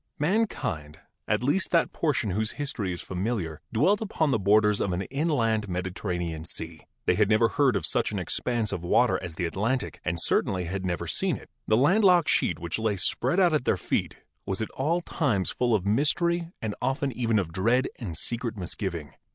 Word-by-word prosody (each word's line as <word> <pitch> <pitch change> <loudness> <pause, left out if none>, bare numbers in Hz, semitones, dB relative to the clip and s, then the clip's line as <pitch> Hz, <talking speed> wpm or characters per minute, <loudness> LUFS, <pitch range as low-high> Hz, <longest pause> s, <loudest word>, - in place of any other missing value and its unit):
Mankind 145 - -1 0.2
— - - -53
at - - +1
least 145 +9 +1
that 170 -1 +2
portion 140 - 0
whose 110 +4 -1
history 125 -10 -2
is 90 - -5
fa - - -8
miliar 90 -5 -2
— - - -49
dwelt 180 - +3
upon 160 -8 0
the 115 - +2
borders 105 +1 +3
of 95 - 0
an 90 +2 -1
inland, 115 -8 0
mediter 90 +1 -4
ranean 85 -3 -2
sea. 80 -1 -6 0.2
They - - +4
had 105 +2 +2
never 110 +1 +4
heard 140 -3 +2
of 85 - -1
such - - +2
an - - -3
expanse 115 -4 -1
of 85 - -4
water 120 +8 +3
as 85 -3 -6
the 90 - -1
Atlantic 110 +10 -1
and 85 -2 -1
certainly 90 +2 +1
had 95 +3 -4
never 90 -1 -2
seen - - 0
it. - - -15 0.2
The 110 - +4
land 185 - +4
locked 180 -4 +5
sheet 85 - +2
which 85 +5 -4
lay 110 -2 +1
spread 170 - 0
out 175 -4 +4
at 150 -5 +1
their' - - +2
feet - - -2 0.3
was 95 -1 -3
at 110 - -3
all 165 +6 0
times 120 - 0
full 120 -2 +1
of 95 -3 -1
mystery 170 +9 +1
and 110 -2 -1
often 135 +2 0
even 115 -2 0
of 85 -5 -1
dread 115 +8 +2
and 90 -10 -5
secret 115 +3 -2
misgiving. 85 -5 -5
110 Hz, 210 wpm, -27 LUFS, 90-140 Hz, 0.3 s, locked